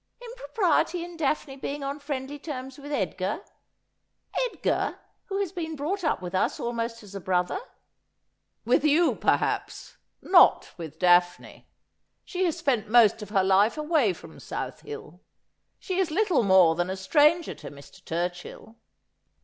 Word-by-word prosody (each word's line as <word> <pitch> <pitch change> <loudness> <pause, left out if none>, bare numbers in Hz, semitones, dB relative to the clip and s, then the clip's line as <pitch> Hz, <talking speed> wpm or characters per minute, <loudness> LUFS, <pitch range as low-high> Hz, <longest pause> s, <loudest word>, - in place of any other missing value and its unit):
Impropriety 460 -7 -1
in 350 0 -9
Daphne 295 -3 -2
being 280 +1 -5
on 280 +1 -4
friendly 285 0 -5
terms 265 -3 -7
with 290 +1 -9
Edgar 190 -5 -2 0.5
— - - -6
Edgar, - - -1 0.3
who 390 -1 -3
has 395 -4 -1
been 325 -3 -5
brought 345 +7 -3
up 305 - 0
with 175 - -6
us 185 - 0
almost 230 -1 -3
as 200 -1 -13
a 195 - -6
brother! 180 0 0 0.6
' - - -51
'With 245 +4 +3
you, 310 +3 +4
perhaps; - - -1 0.2
not 360 -2 +5
with 160 -4 -9
Daphne. 175 -1 +2 0.6
She 375 0 -1
has 340 -2 -1
spent 255 -10 0
most 225 -2 +5
of 210 - -8
her 195 -3 +2
life 195 +7 +3
away 305 - +2
from 175 - -12
South - - -6
Hiil. 440 0 -9 0.6
She 370 0 -3
is 375 -3 +1
little 365 - +2
more 190 -5 +5
than 175 +2 -2
a 190 - -3
stranger 300 - +3
to - - -10
Mr. 140 -1 -15
Turchill.' 175 +6 -5
270 Hz, 155 wpm, -26 LUFS, -, 0.6 s, not